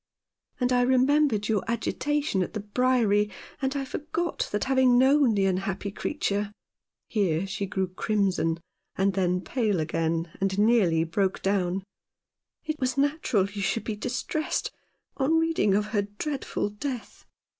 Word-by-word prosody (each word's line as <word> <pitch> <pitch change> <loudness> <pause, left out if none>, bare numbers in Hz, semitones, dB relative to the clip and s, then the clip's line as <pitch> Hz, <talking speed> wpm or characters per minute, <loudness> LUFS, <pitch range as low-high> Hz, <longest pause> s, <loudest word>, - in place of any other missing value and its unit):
And 250 0 +2
I 245 - +4
remembered 260 -3 +3
your 215 -3 +1
agitation 260 +1 0
at 180 - -3
the - - -1
Briery 210 -2 +2 0.2
— - - -21
and 270 +1 -1
I 275 -1 -1
forgot 320 +5 -3
that 210 - 0
having 260 -2 +4
known 265 -2 +5
the 195 -1 +2
unhappy 195 +1 -1
creature 205 -4 -2 0.2
" - - -63
— - - -64
here 190 -5 +1
she 200 0 -3
grew 190 -1 -1
crimson 185 -4 0 0.4
and 195 +1 +2
then 180 -1 +1
pale 215 -5 0
again, 165 +1 -1
and 195 0 0
nearly 205 -7 +4
broke 190 +3 -1
down 195 -1 0 0.3
— - - -63
" - - -51
it 310 -1 -3
was 255 +1 -1
natural 280 -8 +2
you 200 0 -6
should 220 +3 0
be 220 - -3
distressed 255 +7 -2 0.5
on 280 +4 +2
reading 325 -12 +2
of 210 +1 +2
her 205 - +3 0.2
dreadful 275 -7 -2
death. 250 +3 -6
210 Hz, 160 wpm, -27 LUFS, 195-260 Hz, 0.5 s, known